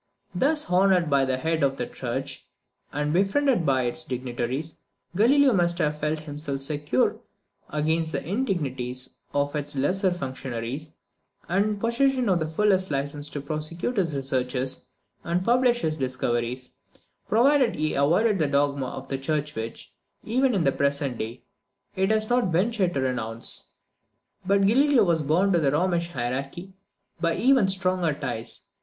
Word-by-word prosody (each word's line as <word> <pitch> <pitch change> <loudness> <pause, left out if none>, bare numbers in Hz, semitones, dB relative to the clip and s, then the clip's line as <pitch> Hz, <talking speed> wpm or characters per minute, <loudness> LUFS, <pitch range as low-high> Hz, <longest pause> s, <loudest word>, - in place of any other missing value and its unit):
Thus 300 +3 +1
honoured 180 -3 +3
by 140 -1 +4
the 130 -1 0
head 160 +3 -1
of 135 -1 +1
the - - -2
church, - - -5 0.4
and 150 +1 -1
befriended 200 - +2
by 130 -2 +2
its 120 +6 -1
dignitaries, 130 +2 -4 0.4
Galileo 265 +6 +5
must 175 -3 +2
have 150 -3 0
felt 150 +1 -1
himself 145 -2 -5
secure 145 -2 0 0.5
against 160 +2 0
the - - -2
indignities 140 - -2
of 145 +1 -1
its 145 -1 -1
lesser 185 +8 +1
functionaries, 130 -2 -5 0.6
and 195 +4 +2
in 215 - 0
the - - -6
possession 250 +1 +1
of 180 -2 +3
the 160 - -1
fullest 190 +3 +2
license 145 +1 -3
to 145 - -5
prosecute 155 - -4
his 165 -6 +1
researches 130 -1 -2 0.4
and 175 +2 -1
publish 245 0 +3
his 155 -1 -1
discoveries, 125 -1 -2 0.6
provided 255 +2 +4
he 155 0 -1
avoided 180 +9 +2
that 150 -3 0
dogma 140 -1 +1
of - - -7
the 135 - -3
church 150 +1 -1
which, 110 +1 -7 0.3
even 255 +2 +1
in 185 - +2
the 135 - +3
present 140 -3 -1
day, 115 +3 -5 0.5
it 190 +1 +1
has 215 0 +1
not 245 -6 +1
ventured 185 0 +1
to 135 - +1
renounce. 115 -3 -1 0.7
But 200 0 +3
Galileo 265 +3 +4
was 170 -4 +2
bound 175 +7 +2
to 170 - +4
the 145 -4 +2
Romish 170 +2 +1
hierarchy 135 +7 -4 0.5
by 170 -1 +1
even 255 -4 +4
stronger 185 -4 +1
ties. 125 -5 -4
155 Hz, 155 wpm, -25 LUFS, 135-195 Hz, 0.7 s, Galileo